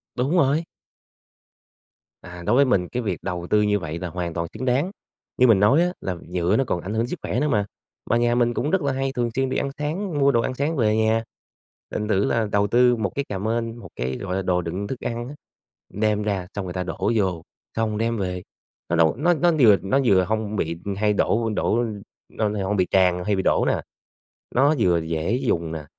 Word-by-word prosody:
Đúng 130 +4 0
rồi. 150 +1 +3 1.6
À, 90 -1 -10
đối 110 +6 +3
với 140 - +5
mình 95 -9 +1
cái 125 - -2
việc 95 -5 -3
đầu 90 -2 -4
tư 105 - +4
như 105 0 +2
vậy 80 -1 -5
là 90 - -4
hoàn 85 -1 -4
toàn 85 0 -2
xứng 115 +4 -5
đáng. 130 +9 +1 0.5
Như 125 - +5
mình 110 -5 +5
nói 105 +11 +5
á 180 0 +1
là 95 - -3
nhựa 90 +3 +1
nó 135 - +3
còn 85 - -1
ảnh 95 +4 -5
hưởng 115 +2 0
sức 165 +4 -5
khỏe - - -2
nữa 150 - +1
mà, 105 -8 +1 0.4
mà 115 - +3
nhà 120 0 +2
mình 120 -1 +2
cũng 145 +6 -1
rất 190 - +2
là 140 -2 0
hay 135 0 -1
thường 120 -3 0
xuyên 135 0 +1
đi - - -1
ăn 140 - -1
sáng, 155 +3 -3
mua 140 0 +5
đồ 120 -3 +2
ăn 130 - -2
sáng 145 +5 -1
về 110 -5 +2
nhà, 110 +1 +2 0.7
thành 105 - -2
thử 100 -2 +2
là 115 -1 +1
đầu 100 0 +2
tư 125 +2 +4
một 105 -5 -2
cái 140 - -1
cà 100 - -3
mên, 115 +2 -2
một 120 - -11
cái, 65 +1 -3
gọi 95 -1 -4
là, 95 - 0
đồ 90 -1 +1
đựng 90 +4 -4
thức 130 - -5
ăn 120 0 -4
á, 140 - -8 0.6
đem 105 0 +1
ra 100 -4 -2
xong 100 -2 -3
người 90 - -5
ta 90 0 -2
đổ 90 - -2
vô, 95 -6 0 0.3
xong 110 -2 -1
đem 115 +1 0
về, 90 -2 -3 0.5
nó 85 - +1
đâu 80 -1 +3
nó 175 +6 +3
nó 175 +1 +3
vừa 110 -6 +7
nó 100 +8 +2
vừa 95 -5 +5
hông 110 0 -2
bị 85 -4 -2 0.2
hay 105 0 +2
đổ 115 +2 +1
đổ, 105 - +1
ưm, 110 -4 -2 0.3
lo 105 - 0
nà 105 -1 -2
hông 105 +2 0
bị 90 - +2
tràn 90 -2 +3
hay 105 - +1
bị 95 - 0
đổ - - +2
nè. - - +1 0.7
Nó 140 +5 +4
vừa 90 -6 +3
dễ 80 +5 -2
dùng 85 - -1
nè, 80 -2 -5
110 Hz, 240 wpm, -23 LUFS, 95-125 Hz, 1.6 s, vừa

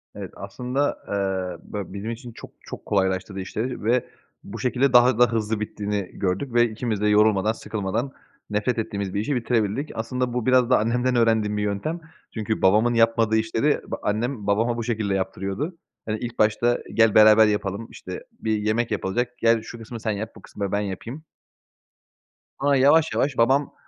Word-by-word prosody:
Evet. - - -7
Aslında, 125 +8 -2
eee, 95 -2 -3
böyle, 100 -2 -5
bizim 100 +3 -4
için 120 +1 -8
çok - - -12
çok - - -10
kolaylaştırdı 95 0 0
işleri 110 +6 -4
ve 120 +3 +2 0.4
bu - - -8
şekilde 130 +1 +1
daha 125 -1 +6
da 120 -1 +5
hızlı 110 -1 -1
bittiğini 105 -2 -3
gördük 100 +7 -2
ve 120 0 +4
ikimiz 110 -1 -3
de 105 - +2
yorulmadan 105 0 +4
sıkılmadan 110 +3 -3 0.4
nefret 105 +4 0
ettiğimiz 100 -3 -3
bir 100 - -1
işi 125 +7 -1
bitirebildik. 120 +2 -1
Aslında 125 +2 -2
bu 125 -2 -2
biraz 130 -1 +4
da 130 - +5
annemden 125 +3 +1
öğrendiğim 110 -3 +2
bir 105 - -1
yöntem 105 - -2 0.3
çünkü 110 -1 -2
babamın 110 +6 +4
yapmadığı 115 -1 +3
işleri 115 +6 +1
b - - 0
annem 110 +1 -2
babama 115 +4 +1
bu 115 - -2
şekilde 110 -3 -1
yaptırıyordu. 95 - -3 0.3
Hani, 110 0 -2
ilk 120 +1 -6
başta 115 +3 +2
"Gel 115 -2 +4
beraber 110 0 +8
yapalım." 105 +1 -2
işte, - - -8 0.2
bir 110 -1 0
yemek 110 +3 0
yapılacak, 120 +5 -2
"Gel 115 -1 +3
şu 115 +2 -9
kısmı 115 +1 -8
sen 110 - -2
yap, 110 +2 -4
bu 105 - -13
kısmı 100 -1 -5
ben 100 - +1
yapayım." 115 - -6 1.4
Ama 140 +1 +3
yavaş 145 +4 +4
yavaş 135 -2 0
babam, 135 +5 +2
110 Hz, 175 wpm, -24 LUFS, 105-120 Hz, 1.4 s, beraber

